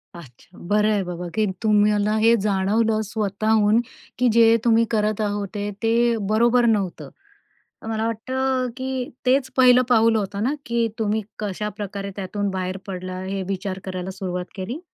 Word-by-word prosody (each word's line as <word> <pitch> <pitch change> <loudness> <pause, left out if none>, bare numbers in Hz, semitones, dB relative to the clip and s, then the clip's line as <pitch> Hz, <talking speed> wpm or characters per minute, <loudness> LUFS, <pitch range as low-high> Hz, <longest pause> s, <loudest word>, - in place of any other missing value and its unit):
अच्छा. 165 +1 -15
बरं 210 +2 +3
आहे 205 -2 +1
बाबा 175 -1 -5
की 215 -1 +2 0.2
तुम्हाला 210 0 +3
हे 230 +2 +5
जाणवलं 215 +3 +1
स्वतःहून 215 0 +2 0.4
की 250 - +3
जे 230 0 +6
तुम्ही 230 0 +4
करत 215 -1 0
होते, 205 0 -3
ते 230 +1 +2
बरोबर 240 +2 +4
नव्हतं. 205 -6 0 0.7
तर - - -8
मला 220 0 -1
वाटतं 255 +3 -1
की 260 -1 -3 0.2
तेच 260 +1 +2
पहिलं 255 -1 +6
पाऊल 230 -1 +4
होतं 200 -1 -2
ना, 265 +5 +1
की 235 -1 0
तुम्ही 220 0 0 0.2
कशाप्रकारे 205 -1 -4
त्यातून 200 +1 -3
बाहेर 185 0 -3
पडला? 185 -1 -5
हे 195 +1 -3
विचार 190 0 -3
करायला 185 0 -4
सुरुवात 180 -2 -4
केली? 225 - -5
210 Hz, 150 wpm, -22 LUFS, 195-230 Hz, 0.7 s, जे